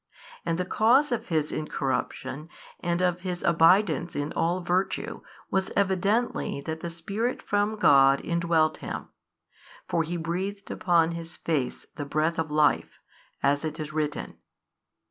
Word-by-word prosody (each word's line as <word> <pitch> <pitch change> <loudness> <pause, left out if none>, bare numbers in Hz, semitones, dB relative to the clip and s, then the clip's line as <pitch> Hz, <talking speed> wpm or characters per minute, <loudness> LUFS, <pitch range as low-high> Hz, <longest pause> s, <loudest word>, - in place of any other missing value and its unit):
And 165 0 +1
the 180 - -1
cause 255 +9 +4
of 240 - -2
his 155 -3 0
incorrup 145 -3 -1
tion 135 +5 -8 0.3
and 175 +1 0
of 180 -1 +1
his 180 -1 -4
abidance 170 0 +4
in 145 +1 -2
all 175 +2 +1
virtue 180 +2 -1 0.3
was 190 0 +1
evidently 200 0 +1
that 160 +2 -4
the 170 - -4
Spirit 200 +9 -2
from 205 +1 0
God 135 -7 +6
indwelt 170 -2 +1
him; - - -6 0.8
for 170 - +1
He 170 +2 -3
breathed 190 +5 -3
upon 170 -2 +2
his 170 0 -7
face 145 -6 -2
the 145 - -3
breath 155 +3 0
of 160 -1 -1
life, 150 0 +2 0.5
as 145 +2 +2
it 155 -1 -4
is 155 0 -5
written. 150 -1 -3
170 Hz, 145 wpm, -27 LUFS, 155-185 Hz, 0.8 s, God